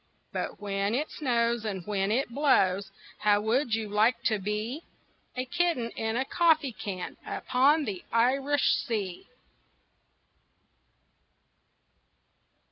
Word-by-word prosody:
But -, -, -4 dB
when 200 Hz, +1 st, -1 dB
it 300 Hz, +4 st, -2 dB
snows 235 Hz, -4 st, 0 dB
and 195 Hz, -5 st, -4 dB
when 200 Hz, -1 st, 0 dB
it 255 Hz, +4 st, +1 dB
blows, 200 Hz, -10 st, +2 dB, 0.3 s
How 205 Hz, -1 st, +4 dB
would 230 Hz, +2 st, +1 dB
you 225 Hz, -1 st, -3 dB
like 215 Hz, +4 st, +2 dB
to 215 Hz, -2 st, +1 dB
be 210 Hz, -, -3 dB, 0.5 s
A 255 Hz, 0 st, -2 dB
kitten 255 Hz, -5 st, 0 dB
in 225 Hz, 0 st, -3 dB
a 260 Hz, -, 0 dB
coffee 315 Hz, -3 st, +3 dB
can 190 Hz, -4 st, -6 dB
Upon 285 Hz, +5 st, +2 dB
the 195 Hz, -6 st, -5 dB
Irish 270 Hz, +5 st, +2 dB
Sea? 205 Hz, -8 st, -4 dB
230 Hz, 115 wpm, -28 LUFS, 205-270 Hz, 0.5 s, How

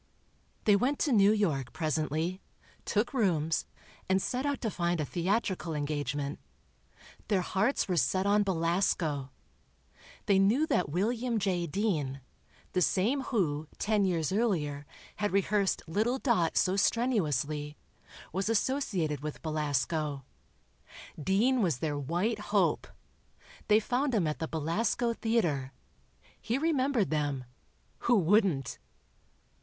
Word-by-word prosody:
They 210 Hz, -, +5 dB
went 260 Hz, +8 st, +1 dB
to 295 Hz, -, +1 dB
New 205 Hz, -3 st, +6 dB
York, 160 Hz, -, 0 dB
presently, 155 Hz, +3 st, -1 dB, 0.4 s
took 215 Hz, +5 st, 0 dB
rooms 165 Hz, -, +1 dB, 0.4 s
and 190 Hz, 0 st, +4 dB
set 255 Hz, +7 st, -2 dB
out 285 Hz, -1 st, -1 dB
to 225 Hz, -, -1 dB
find 175 Hz, -1 st, -1 dB
a 150 Hz, -, 0 dB
theatrical 180 Hz, -1 st, -1 dB
engagement. 145 Hz, -1 st, -2 dB, 0.9 s
Their 200 Hz, -4 st, +2 dB
hearts 200 Hz, +10 st, 0 dB
were 180 Hz, -2 st, 0 dB
set 185 Hz, +3 st, +1 dB
on 205 Hz, +1 st, +4 dB
Belasco. 165 Hz, -6 st, 0 dB, 1.0 s
They 195 Hz, -1 st, +4 dB
knew 220 Hz, +11 st, +3 dB
that 180 Hz, -, 0 dB
William 230 Hz, -, 0 dB
J. 180 Hz, -4 st, 0 dB
Dean—the 150 Hz, -, -3 dB
same 220 Hz, +11 st, +2 dB
who, 160 Hz, -, -1 dB
ten 210 Hz, -1 st, +1 dB
years 170 Hz, -5 st, 0 dB
earlier, 155 Hz, -10 st, 0 dB, 0.3 s
had 205 Hz, 0 st, -1 dB
rehearsed 200 Hz, 0 st, +1 dB
little 220 Hz, +10 st, 0 dB
Dot 225 Hz, -, +1 dB
so 185 Hz, 0 st, +3 dB
strenuously—was 160 Hz, -, -2 dB
associated 200 Hz, -, 0 dB
with 150 Hz, +1 st, -6 dB
Belasco. 150 Hz, -2 st, -1 dB, 1.0 s
Dean 230 Hz, -, +2 dB
was 170 Hz, -, +1 dB
their 150 Hz, +2 st, -2 dB
white 175 Hz, -, -1 dB
hope. -, -, +2 dB, 0.8 s
They 215 Hz, 0 st, +5 dB
found 250 Hz, +4 st, 0 dB
him 195 Hz, -6 st, +2 dB
at 150 Hz, -1 st, -2 dB
the 160 Hz, -, -2 dB
Belasco 190 Hz, +10 st, 0 dB
Theatre. 170 Hz, -, 0 dB, 0.7 s
He 235 Hz, -, -1 dB
remembered 275 Hz, -, +1 dB
them... 145 Hz, -4 st, -1 dB, 0.6 s
who 240 Hz, -1 st, +3 dB
wouldn't? 180 Hz, -, +2 dB
185 Hz, 120 wpm, -30 LUFS, 155-220 Hz, 1.0 s, New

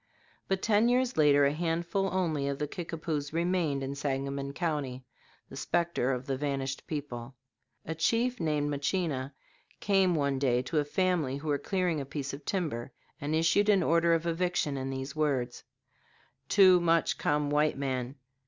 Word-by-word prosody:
But 190 Hz, 0 st, -1 dB
ten 220 Hz, +2 st, +4 dB
years 250 Hz, 0 st, +2 dB
later 145 Hz, -2 st, +5 dB
a 140 Hz, -, +2 dB
handful 170 Hz, +4 st, -1 dB
only 160 Hz, -7 st, 0 dB
of 140 Hz, -1 st, -2 dB
the 150 Hz, +1 st, -2 dB
Kickapoos 155 Hz, -3 st, -4 dB
remained 165 Hz, -5 st, 0 dB
in 135 Hz, +1 st, -3 dB
Sangamon 140 Hz, 0 st, -3 dB
County, 140 Hz, -6 st, -3 dB, 0.4 s
the -, -, -11 dB
specter 170 Hz, -7 st, 0 dB
of 125 Hz, 0 st, -3 dB
the 135 Hz, -2 st, -1 dB
vanished 135 Hz, -1 st, -3 dB
people. 135 Hz, -5 st, -5 dB, 0.5 s
A 160 Hz, -, -3 dB
chief 235 Hz, +10 st, +1 dB
named 150 Hz, -3 st, 0 dB
Machina 140 Hz, -2 st, -1 dB, 0.5 s
came 195 Hz, -3 st, +3 dB
one 140 Hz, -3 st, 0 dB
day 125 Hz, -2 st, +2 dB
to 155 Hz, +4 st, 0 dB
a 145 Hz, -, 0 dB
family 160 Hz, -4 st, 0 dB
who 150 Hz, +2 st, -5 dB
were 145 Hz, -1 st, +1 dB
clearing 180 Hz, -6 st, -1 dB
a -, -, -5 dB
piece 140 Hz, -1 st, -4 dB
of 140 Hz, +1 st, -8 dB
timber, 150 Hz, -10 st, -2 dB, 0.3 s
and 145 Hz, +2 st, -1 dB
issued 165 Hz, +6 st, +3 dB
an 195 Hz, -3 st, +4 dB
order 170 Hz, 0 st, +3 dB
of 165 Hz, 0 st, -2 dB
eviction 170 Hz, -3 st, 0 dB
in 135 Hz, 0 st, -3 dB
these 135 Hz, +1 st, -5 dB
words: 135 Hz, -6 st, -1 dB, 0.9 s
"Too 185 Hz, -2 st, +7 dB
much 165 Hz, -1 st, +2 dB
come 145 Hz, 0 st, 0 dB
white 150 Hz, 0 st, +2 dB
man. 130 Hz, -1 st, -2 dB
150 Hz, 165 wpm, -30 LUFS, 140-175 Hz, 0.9 s, Too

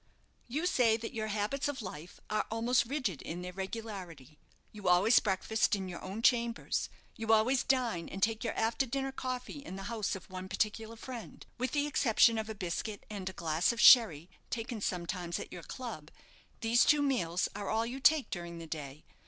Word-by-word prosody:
"You 295 Hz, +8 st, -2 dB
say 240 Hz, -10 st, +3 dB
that 225 Hz, +3 st, -6 dB
your 220 Hz, -2 st, -2 dB
habits 215 Hz, +7 st, -1 dB
of 290 Hz, -2 st, -3 dB
life 175 Hz, -2 st, -8 dB
are 215 Hz, 0 st, -1 dB
almost 230 Hz, +2 st, +2 dB
rigid 245 Hz, -, -2 dB
in 175 Hz, +2 st, -5 dB
their 180 Hz, 0 st, -6 dB
regularity. 190 Hz, -, -7 dB, 0.3 s
You 205 Hz, -3 st, -7 dB
always 190 Hz, +7 st, +6 dB
breakfast 210 Hz, +2 st, +1 dB
in 190 Hz, -2 st, -4 dB
your 175 Hz, -2 st, -7 dB
own 200 Hz, +5 st, -5 dB
chambers; 235 Hz, -1 st, +2 dB, 0.3 s
you 225 Hz, 0 st, -1 dB
always 230 Hz, +4 st, +4 dB
dine 235 Hz, -10 st, 0 dB
and 195 Hz, 0 st, -4 dB
take 225 Hz, 0 st, +1 dB
your 235 Hz, -, -2 dB
after 230 Hz, +4 st, +1 dB
dinner 270 Hz, +2 st, -2 dB
coffee 255 Hz, +1 st, -4 dB
in 190 Hz, -, -7 dB
the 195 Hz, -, -6 dB
house 215 Hz, -4 st, -1 dB
of 190 Hz, -, -10 dB
one 185 Hz, 0 st, -7 dB
particular 220 Hz, +2 st, -1 dB
friend. 235 Hz, 0 st, -9 dB
With 255 Hz, +1 st, -1 dB
the 290 Hz, -1 st, +2 dB
exception 230 Hz, -5 st, +4 dB
of 220 Hz, 0 st, -4 dB
a 220 Hz, -, -4 dB
biscuit 200 Hz, +2 st, -4 dB
and 195 Hz, -3 st, -4 dB
a -, -, -9 dB
glass 165 Hz, +2 st, +1 dB
of 235 Hz, -, -6 dB
sherry 200 Hz, -, +7 dB, 0.2 s
taken 230 Hz, -1 st, -4 dB
sometimes 175 Hz, -1 st, -2 dB
at -, -, -7 dB
your 175 Hz, -, -7 dB
club, 220 Hz, -, -7 dB, 0.5 s
these 230 Hz, +1 st, +4 dB
two 295 Hz, -1 st, +4 dB
meals 185 Hz, -11 st, +1 dB
are 205 Hz, -1 st, -4 dB
all 225 Hz, +1 st, +1 dB
you 250 Hz, +3 st, -5 dB
take 300 Hz, +1 st, +4 dB
during 170 Hz, -1 st, -5 dB
the 165 Hz, -, -7 dB
day. 150 Hz, -2 st, -7 dB
220 Hz, 195 wpm, -32 LUFS, 185-240 Hz, 0.5 s, sherry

